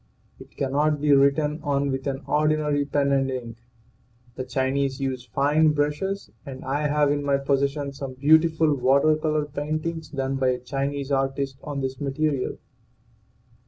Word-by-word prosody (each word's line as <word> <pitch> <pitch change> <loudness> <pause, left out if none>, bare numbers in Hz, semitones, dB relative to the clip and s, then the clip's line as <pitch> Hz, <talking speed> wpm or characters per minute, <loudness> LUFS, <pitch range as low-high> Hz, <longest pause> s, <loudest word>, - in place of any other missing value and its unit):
It - - -15
cannot 145 +2 +1
be 145 0 +3
written 140 +2 +3
on 140 -1 0
with 135 +1 -3
an 135 0 -3
ordinary 150 -1 +1
pen 140 0 +1
and 135 -1 +2
ink. 120 -3 -5 0.8
The 130 - -5
Chinese 130 +1 -1
use 130 -2 -3
fine 150 +6 +3
brushes, 150 +7 -2
and 130 -3 -9
I 145 +3 0
have 150 -1 +2
in 145 0 -1
my 140 -1 +2
possession 140 +1 -1
some 135 -2 -7
beautiful 160 +2 +4
water 140 +3 +3
color 155 -1 0
paintings 155 +2 -4
done 135 -2 -2
by 130 -1 +1
a 125 -1 +2
Chinese 140 +2 -3
artist 135 0 -1
on 145 -2 -4
this 130 0 -4
material. 140 -1 -1
140 Hz, 155 wpm, -24 LUFS, 135-150 Hz, 0.8 s, beautiful